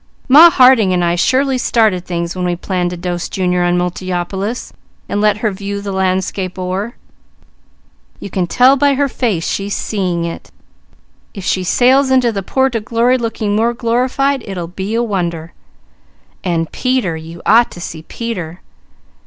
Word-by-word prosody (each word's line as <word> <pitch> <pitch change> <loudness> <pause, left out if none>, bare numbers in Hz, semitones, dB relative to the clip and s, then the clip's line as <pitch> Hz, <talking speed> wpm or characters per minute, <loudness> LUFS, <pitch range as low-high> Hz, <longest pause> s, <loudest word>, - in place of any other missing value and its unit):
Ma 305 +6 +9
Harding 255 - +5
and 175 -1 +1
I 170 - +1
surely 260 +8 +1
started 215 -8 +1
things 170 0 -3
when 180 - -3
we 175 -1 0
planned 180 0 -2
to 180 - -6
dose 175 0 -4
Junior 180 -1 0
on 175 0 +1
Multiopolis, 185 +5 -3 0.3
and 205 - -1
let 210 -1 +3
her 215 - +2
'view 200 +1 -5
the 200 0 -5
landscape 185 0 -1
o'er.' 185 +6 -3 1.2
You 200 - -8
can 180 -1 -1
tell 255 +7 +5
by 280 0 +2
her 285 +1 +1
face 220 -11 -2
she's 200 +1 -2
seeing 180 -5 -2
it! 170 - -7 0.9
If 195 -3 -7
she 185 - 0
sails 260 +8 +3
into 255 -2 +3
the 200 -3 -3
port 265 +6 0
o' - - +1
glory 235 +3 +1
looking 220 -3 -2
more 230 +2 +1
glorified, 255 +3 0
it'll 185 -3 -4
be 190 +5 -5
a 235 - +1
wonder! 170 -6 -3 0.9
And 165 -3 -1
Peter! 255 -10 -1
You 165 +2 -10
ought 230 +3 +5
to - - -11
see 160 -2 -7
Peter! 180 -4 -6
200 Hz, 165 wpm, -16 LUFS, 180-240 Hz, 1.2 s, Ma